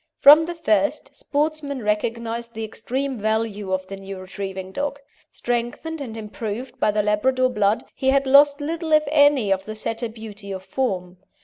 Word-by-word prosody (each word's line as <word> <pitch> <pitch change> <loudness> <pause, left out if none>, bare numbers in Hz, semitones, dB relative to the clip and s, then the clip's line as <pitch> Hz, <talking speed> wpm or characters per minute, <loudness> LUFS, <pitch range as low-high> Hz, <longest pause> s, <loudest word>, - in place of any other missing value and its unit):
From 300 +3 +9
the 345 +1 -5
first, 315 -3 0
sportsmen 295 - -2
recognised 230 +2 -2
the 225 - -4
extreme 255 +4 -3
value 215 -2 -1
of 185 0 -1
the 195 +1 -8
new 195 0 -8
retrieving 190 0 -6
dog. 285 +5 -3 0.3
Strengthened 245 +7 -3
and 225 -5 -6
improved 225 +4 -6
by - - +3
the 210 0 +1
Labrador 255 +5 +2
blood, 210 -2 +1
he 265 - 0
had 275 0 +3
lost 285 +2 +6
little 325 +2 -3
if 305 0 +6
any 285 -8 +4
of 190 0 -4
the 215 - -6
Setter 225 +2 -3
beauty 215 -3 -9
of 190 -1 -5
form. 185 -9 -2
230 Hz, 170 wpm, -23 LUFS, 210-280 Hz, 0.3 s, From